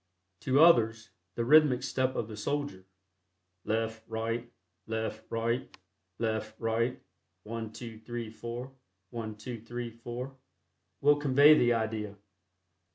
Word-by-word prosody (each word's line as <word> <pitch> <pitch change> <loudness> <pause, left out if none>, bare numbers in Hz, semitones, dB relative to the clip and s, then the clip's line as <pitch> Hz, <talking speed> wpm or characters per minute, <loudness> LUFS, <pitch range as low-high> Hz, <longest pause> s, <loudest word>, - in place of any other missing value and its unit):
To 130 +7 +2
others, 115 - +4 0.2
the 115 - -1
rhythmic 145 -2 +6
step 130 0 0
of 105 - -1
the 110 - -7
soldier: 145 -3 -3 0.8
"Left, 110 0 -1
right; 115 +2 -3 0.4
left, 110 0 -3
right; 115 +2 -2 0.4
left, 110 -1 -2
right; 115 +2 0 0.4
one, 115 0 -5
two, 115 -1 -8
three, 120 -1 -5
four; 120 +3 -6 0.4
one, 110 -2 -5
two, 115 +1 -7
three, 120 +1 -5
four," 120 +3 -7 0.7
will 145 +1 +6
convey 145 +1 +7
the 120 -4 +4
idea. 110 -2 -2
115 Hz, 120 wpm, -30 LUFS, 110-125 Hz, 0.8 s, convey